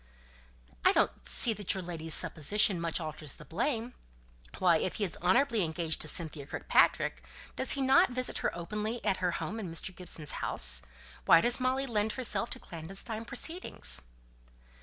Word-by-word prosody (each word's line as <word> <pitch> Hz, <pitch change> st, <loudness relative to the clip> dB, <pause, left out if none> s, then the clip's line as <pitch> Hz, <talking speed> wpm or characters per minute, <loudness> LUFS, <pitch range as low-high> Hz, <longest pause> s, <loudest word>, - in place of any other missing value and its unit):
"I -, -, +4 dB
don't -, -, -1 dB
see 230 Hz, -, +9 dB
that 205 Hz, -2 st, 0 dB
your 190 Hz, -, -5 dB
ladyship's 165 Hz, -2 st, +1 dB
supposition 185 Hz, +3 st, +2 dB
much 165 Hz, 0 st, -2 dB
alters 155 Hz, -2 st, -7 dB
the -, -, -15 dB
blame. 235 Hz, -, -3 dB, 0.6 s
Why, 175 Hz, -3 st, +3 dB
if 175 Hz, -, -3 dB
he 215 Hz, -, -3 dB
is 185 Hz, -, -2 dB
honourably 230 Hz, +5 st, +1 dB
engaged 160 Hz, 0 st, -3 dB
to -, -, 0 dB
Cynthia 155 Hz, -3 st, -2 dB
Kirkpatrick, -, -, 0 dB, 0.3 s
does -, -, +2 dB
he 275 Hz, -, -1 dB
not 265 Hz, -1 st, +4 dB
visit 255 Hz, 0 st, +2 dB
her -, -, -1 dB
openly 210 Hz, +7 st, -5 dB
at 190 Hz, -, 0 dB
her 180 Hz, -1 st, -2 dB
home 225 Hz, -, -5 dB
in 190 Hz, -6 st, -7 dB
Mr. 170 Hz, +3 st, -3 dB
Gibson's 165 Hz, -5 st, -4 dB
house? 60 Hz, 0 st, +4 dB, 0.4 s
Why 165 Hz, -, +6 dB
does 240 Hz, +9 st, +1 dB
Molly 260 Hz, +1 st, -1 dB
lend 220 Hz, -3 st, -2 dB
herself 225 Hz, -6 st, -1 dB
to -, -, -5 dB
clandestine 195 Hz, +7 st, -6 dB
proceedings?" 330 Hz, +10 st, -3 dB
190 Hz, 165 wpm, -29 LUFS, 165-230 Hz, 0.6 s, see